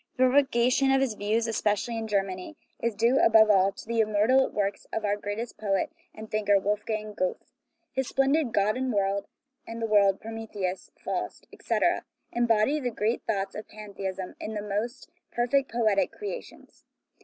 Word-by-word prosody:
The 255 - +4
propagation 260 -1 +3
of 270 - +4
his 265 -4 +1
views, 215 +2 0
especially 225 0 0
in 225 -1 -3
Germany, 195 +6 -2 0.2
is 235 -2 -1
due, 235 +5 +3
above 220 -1 +6
all, 195 -1 +4
to - - -11
the 230 0 -1
immortal 220 +5 +3
works 200 -1 -2
of 220 - -2
our 205 0 +2
greatest 205 +3 -5
poet 200 -2 0 0.2
and 220 0 -10
thinker, 205 -1 +3
Wolfgang 210 +1 -2
Goethe. 185 -2 -3 0.4
His 265 -1 -1
splendid 270 0 +2
God 210 +3 +2
and 260 0 -1
the 220 +4 -3
World, 200 -3 +4
Prometheus, 210 -5 -5
Faust, - - -4
etc., - - 0 0.3
embody 240 +4 +2
the 250 -4 -1
great 225 0 -1
thoughts 195 -1 -1
of 210 - -7
pantheism 195 -3 -6
in 215 +1 -5
the 210 - -3
most 215 +5 -3 0.2
perfect 255 +3 +1
poetic 220 -4 +2
crea 420 +4 -5
tions. - - -18
215 Hz, 160 wpm, -27 LUFS, 205-240 Hz, 0.4 s, above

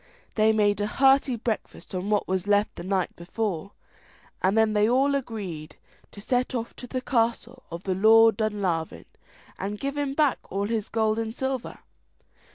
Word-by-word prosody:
They 220 0 +4
made 205 -2 +2
a 205 - 0
hearty 270 +1 +3
breakfast 225 -2 -5
on 185 +2 -3
what 210 -1 +1
was 190 +1 -1
left 205 +1 +2
the - - -7
night 190 0 -1
before, 195 +1 -4 0.7
and 190 +4 +2
then 220 -1 +3
they 210 +1 +3
all 270 +3 +3
agreed 200 - -5 0.4
to - - -12
set 250 +4 -1
off 235 -1 -4
to 250 - -8
the 255 +1 -3
castle 235 +1 -1
of 170 +2 -6
the 190 - -1
Lord 225 +3 +5
of 215 0 +1
Dunlavin, 175 -6 -3 0.5
and 205 +2 -4
give 275 +1 -3
him 280 -1 -2
back 295 -3 +2
all 200 +1 -1
his 220 -1 -2
gold 220 -1 +1
and 225 0 -4
silver. 265 -2 -3
220 Hz, 175 wpm, -26 LUFS, 200-245 Hz, 0.7 s, Lord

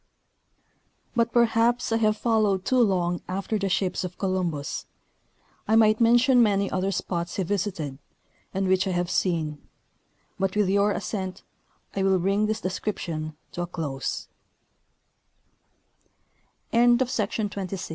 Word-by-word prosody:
But 235 0 +2
perhaps 235 0 +2
I 225 - +3
have 215 -1 +2
followed 210 -5 +1
too 255 - +2
long 180 -6 +2
after 195 +3 -2
the 195 -1 -1
ships 185 0 0
of 180 -1 -6
Colum 185 -2 0
bus. 145 -2 -5 0.8
I 220 - +3
might 215 0 +4
mention 240 +2 +5
many 200 -3 +2
other 185 +1 0
spots 170 -3 -3
he 190 - 0
visited, 175 -7 -3 0.5
and 195 0 -1
which 185 0 +2
I 190 - 0
have 175 0 -1
seen; 160 -6 0 0.8
but 195 0 0
with 210 -3 +2
you 200 +1 +3
assent 190 -2 -3 0.5
I 195 - 0
will 190 0 +3
bring 195 +4 +1
this 215 +1 -2
description 165 -5 -4
to 175 - -4
a 175 - -2
clos 150 -6 -4
195 Hz, 125 wpm, -26 LUFS, 180-215 Hz, 0.8 s, mention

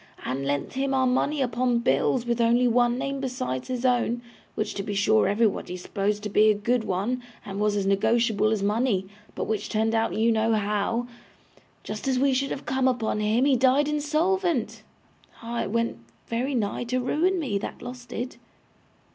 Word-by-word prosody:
And 135 +2 -2
lent 140 0 -2
him 270 0 0
our 260 -1 +3
money 275 +3 +1
upon 245 0 +1
bills, 235 +1 +1
with 235 0 0
only 240 +2 +4
one 240 0 +3
name 275 +1 -3
besides 255 - -3
his 255 0 -3
own, 240 -1 +1 0.3
which 215 - -2
to 200 - -3
be 205 +1 -4
sure 215 +2 +3
everybody 205 -3 0
supposed 205 +3 -2
to 210 - -3
be 215 +2 +5
a 210 - +4
good 235 +3 0
one, 210 +6 -1 0.2
and 200 -2 -5
was 210 0 +1
as 200 -1 0
negotiable 215 +2 +2
as 215 -3 0
money, 210 -2 +1 0.3
but - - -2
which 215 -1 -2
turned 220 +1 +1
out 225 0 +1
you 225 +2 +3
know 225 0 +2
how. 210 +3 0 0.8
Just 215 - -5
as 260 -1 +2
we 270 +1 +3
should 275 +2 0
have 275 - -5
come 265 0 +1
upon 235 -4 0
him, 215 +5 +2
he 280 -2 +4
died 260 +3 +3
insolvent. 305 - 0 0.6
Ah! 235 +1 -3
it - - -3
went 230 - -1 0.3
very 255 +4 -2
nigh 215 0 -1
to 255 +2 -1
ruin 325 +9 +1
me, 235 -11 -1
that - - -7
loss 245 0 -7
did! 245 +1 -6
235 Hz, 190 wpm, -26 LUFS, 210-255 Hz, 0.8 s, be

